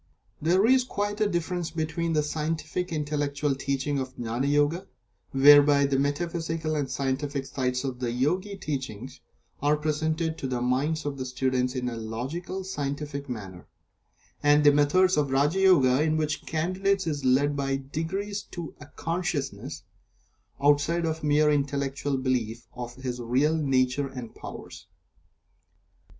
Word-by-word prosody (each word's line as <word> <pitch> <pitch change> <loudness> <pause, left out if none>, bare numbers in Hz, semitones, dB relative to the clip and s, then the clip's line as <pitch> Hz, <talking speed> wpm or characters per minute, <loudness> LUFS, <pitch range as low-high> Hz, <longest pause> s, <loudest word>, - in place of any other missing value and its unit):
There 180 +6 +3
is 255 +2 +5
quite 205 -3 -3
a 210 - +3
difference 175 -1 -2
between 165 +1 -2
the 150 -1 +2
scientific, 160 +3 -2
intellectual 145 -2 -1
teaching 140 +1 -1
of 130 -1 -5
Gnani 120 +3 -2
Yoga, 145 +6 +1 0.4
whereby 145 +1 +7
the 135 -1 +1
metaphysical 160 +2 -1
and 145 -3 -1
scientific 135 +1 -2
sides 125 -1 -2
of 130 -2 -4
the 120 -2 -1
Yogi 180 +11 0
teachings 130 - -5 0.4
are 145 +1 +3
presented 155 +2 -1
to 135 - -3
the 125 -1 -2
minds 135 +6 0
of 140 -2 -3
the 130 - -3
students, 130 0 0
in 125 -1 -2
a 120 -2 -3
logical, 135 +13 -4
scientific 145 -4 -4
manner, 95 -7 -7 0.7
and 145 0 +5
the 145 - +8
methods 150 +6 +3
of 145 -2 +2
Raja 145 +7 +2
Yoga, 145 -9 +5
in 155 0 +2
which 155 -1 -1
the - - -24
Candidate 190 +4 0
is 145 -4 -2
led 140 +3 +3
by 135 -1 0 0.2
degrees 195 +7 -2
to 170 -3 -6
a 145 - -11
consciousness 165 -4 -3 0.8
(outside 145 +4 +3
of 160 -1 -2
mere 150 0 +4
intellectual 140 -1 -1
belief) 120 -3 -1
of 120 -1 -7
his 125 -2 -5
real 130 +7 +2
nature 135 -2 +1
and 125 -4 -8
powers. - - -10
145 Hz, 145 wpm, -27 LUFS, 130-160 Hz, 0.8 s, the